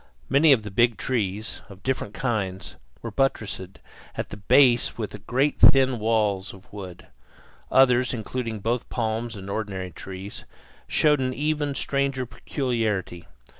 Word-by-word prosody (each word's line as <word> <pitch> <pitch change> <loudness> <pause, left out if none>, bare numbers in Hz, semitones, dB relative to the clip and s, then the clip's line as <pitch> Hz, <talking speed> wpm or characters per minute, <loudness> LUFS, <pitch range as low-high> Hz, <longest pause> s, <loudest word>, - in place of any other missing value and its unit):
Many 145 +3 +5
of 120 -6 +4
the 105 - -7
big 115 +1 +3
trees, 110 -4 -2
of 100 -1 -13
different 130 -5 -2
kinds, 100 -7 -2 0.3
were 115 - -4
buttressed 100 -7 -2 0.4
at - - -4
the - - -7
base 120 +4 +4
with 105 -2 -6
great 135 +4 +1
thin 130 -3 +6
walls 105 -3 0
of 95 +1 -18
wood. 95 -4 -9 0.7
Others, 125 -2 +5
including 115 -1 -4
both 115 +3 -1
palms 115 0 -2
and 95 -1 -8
ordinary 100 -3 -4
trees, 95 +3 -8 0.4
showed 150 -2 +3
an 130 -1 -1
even 150 -1 -1
stranger 140 -1 -1
peculiarity. 110 - -2
115 Hz, 135 wpm, -25 LUFS, 100-130 Hz, 0.7 s, thin